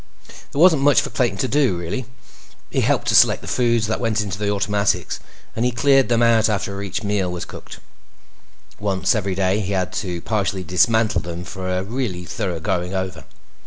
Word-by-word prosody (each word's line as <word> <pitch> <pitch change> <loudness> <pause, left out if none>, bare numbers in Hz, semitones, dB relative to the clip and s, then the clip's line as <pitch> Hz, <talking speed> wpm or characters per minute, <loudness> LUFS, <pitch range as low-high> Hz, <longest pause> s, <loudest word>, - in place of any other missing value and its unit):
There 140 - -4
wasn't 165 -4 +6
much 145 0 +5
for 145 -1 -3
Clayton 125 -3 0
to 130 - 0
do, 130 -9 +2
really. 90 +9 -4 0.6
He - - +1
helped - - +1
to - - +3
select - - +5
the - - -9
foods 120 -3 +1
that 110 - -2
went 115 -2 0
into 100 -2 -3
the 105 -1 -1
automatics, 100 0 0 0.4
and 115 - -1
he 125 - +3
cleaned 135 +1 +3
them 120 0 +3
out 115 -1 +4
after 100 -1 -2
each 100 +2 -4
meal 100 -3 0
was 90 -1 -5
cooked. - - -11 1.0
Once 100 -2 +1
every 100 -4 -1
day, 95 +1 +1
he 100 -1 -2
had 95 -1 -1
to 90 -4 -3
partially 100 -3 -1
dismantle 100 +3 +2
them 85 +1 -6
for 95 0 -6
a 90 0 -1
really 100 -5 -4
thorough 85 -1 -3
going 90 0 -2
over. 95 -3 -4
100 Hz, 195 wpm, -21 LUFS, 95-115 Hz, 1.0 s, wasn't